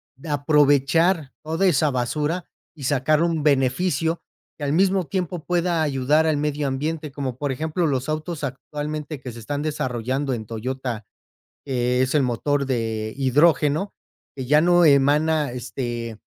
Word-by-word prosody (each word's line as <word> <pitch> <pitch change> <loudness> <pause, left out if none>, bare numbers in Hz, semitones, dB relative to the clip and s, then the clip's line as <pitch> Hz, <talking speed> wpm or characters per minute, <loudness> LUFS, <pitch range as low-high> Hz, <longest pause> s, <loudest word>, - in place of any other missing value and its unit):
de 140 +5 -10
aprovechar 145 +2 +3
toda 160 +5 0
esa 155 -4 +3
basura 150 +7 -1 0.3
y 145 - -11
sacar 145 +4 +2
un 165 -2 0
beneficio 150 +4 +1 0.4
que - - -6
al 140 - 0
mismo 190 +1 +2
tiempo 180 -4 -3
pueda 175 -1 +1
ayudar 150 +2 +2
al 155 -2 +2
medio 150 0 -1
ambiente, 150 +3 -3
como 135 -3 -4
por 145 0 -2
ejemplo 160 +5 -1
los 135 -1 -1
autos 155 +1 -3
actualmente 150 +3 -5
que 125 -1 -7
se 120 - -10
están 145 +6 -4
desarrollando 130 -2 -2
en 110 -3 -4
Toyota. 120 0 -4 0.6
Es 125 0 +1
el 150 - +4
motor 140 +3 0
de 115 -4 -2
hidrógeno 150 +6 +2 0.4
que 130 -2 -5
ya 150 +3 +5
no 175 +1 +5
emana 150 +1 +3
este 120 -2 -5
145 Hz, 145 wpm, -23 LUFS, 130-155 Hz, 0.6 s, ya